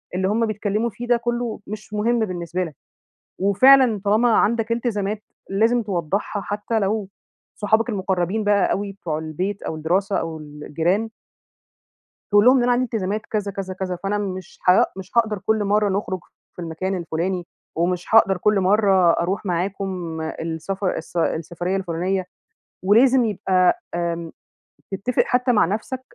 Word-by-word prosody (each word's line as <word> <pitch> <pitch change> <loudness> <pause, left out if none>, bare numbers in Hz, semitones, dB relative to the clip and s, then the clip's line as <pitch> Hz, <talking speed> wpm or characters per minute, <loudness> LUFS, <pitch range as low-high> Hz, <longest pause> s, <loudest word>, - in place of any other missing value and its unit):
اللي 190 +1 +1
هُم 225 +3 +1
بيتكلّموا 215 +1 -1
فيه 240 +3 -8
ده 240 0 +4
كلّه 240 -1 -2
مش 210 0 -8
مهم 230 +3 +1
بالنسبة 180 -4 -2
لك. 160 -5 -7 0.6
وفعلًا 230 +3 +5
طالما 220 +4 +3
عندك 230 +1 +2
إلتزامات، 215 -3 -2 0.3
لازم 225 +5 +2
توضحها 200 +1 -2
حتّى 210 +3 -2
لو 205 0 -1 0.5
صحابك 220 +3 +2
المقربين 190 0 -1
بقى 205 -1 +3
أوي، 200 0 -2
بتوع 165 -6 -4
البيت 180 +6 -4
أو - - -4
الدراسة 185 +6 0
أو 165 -1 -3
الجيران 160 +8 -2 1.2
تقول 205 +1 +5
لهم 255 +2 +7
إن 245 - +2
أنا 245 - +3
عندي 245 +1 +2
التزامات 215 -2 -2
كذا، 205 -2 -2
كذا، 195 -1 -5
كذا، 185 -1 -3
فأنا 200 +1 0
مش 190 -2 -5
ها 180 - +6
مش 190 0 -9
هاقدر 220 -3 +3
كل 220 -1 +2
مرة 205 +1 +2
نخرج 190 -1 -2 0.4
في - - -8
المكان 175 +3 -3
الفلاني، 175 +1 -3 0.3
ومش 175 +1 0
هاقدر 195 -4 +6
كل 210 +2 +2
مرة 190 -2 +4
أروح 185 +4 -1
معاكم 180 -2 -3
السفر 165 +4 -3
الس - - -7
السفرية 170 +3 -1
الفلانية، 185 0 -1 0.6
ولازم 245 +5 +5
يبقى 185 -3 +2
آمم 170 -1 -2 0.6
تتفق 200 +6 0
حتى 250 +1 +2
مع 215 - +4
نفسك 220 +8 -3
195 Hz, 150 wpm, -22 LUFS, 180-215 Hz, 1.2 s, لهم